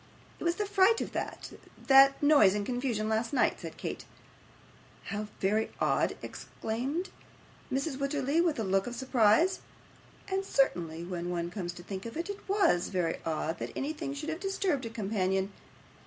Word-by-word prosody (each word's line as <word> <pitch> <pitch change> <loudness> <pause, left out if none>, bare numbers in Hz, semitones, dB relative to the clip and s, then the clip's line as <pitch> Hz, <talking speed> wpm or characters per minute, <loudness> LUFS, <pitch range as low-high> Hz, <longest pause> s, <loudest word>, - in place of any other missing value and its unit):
'It - - -6
was 340 0 +2
the 415 - -1
fright 410 +2 +4
of - - -3
that - - -5 0.3
that 275 +1 +7
noise 285 -10 +6
and 205 -1 -1
confusion 245 -3 -1
last 220 +1 0
night,' - - +2
said - - -8
Kate. - - -5 1.0
'How 210 0 -4
very 210 +3 +1
odd!' - - +1
exclaimed 270 - -4 0.6
Mrs. 270 +1 -1
Wititterly, 280 +2 +1
with 330 -4 +1
a 225 - -1
look 195 +1 +1
of 240 - -5
surprise. 260 - +3 0.7
And 385 0 -1
certainly, 170 - 0
when 175 0 -4
one 170 -1 -2
comes 175 -4 -4
to 175 0 -11
think 195 +3 -6
of 230 - -7
it, 345 +5 -2
it 405 0 -11
WAS 385 - +3
very 175 -4 -1
odd 160 +1 -2
that - - -4
anything 285 -1 -3
should 300 +3 -5
have 320 +1 -3
disturbed 375 -9 -1
a - - -5
companion. 195 -3 -1
245 Hz, 170 wpm, -30 LUFS, 195-310 Hz, 1.0 s, that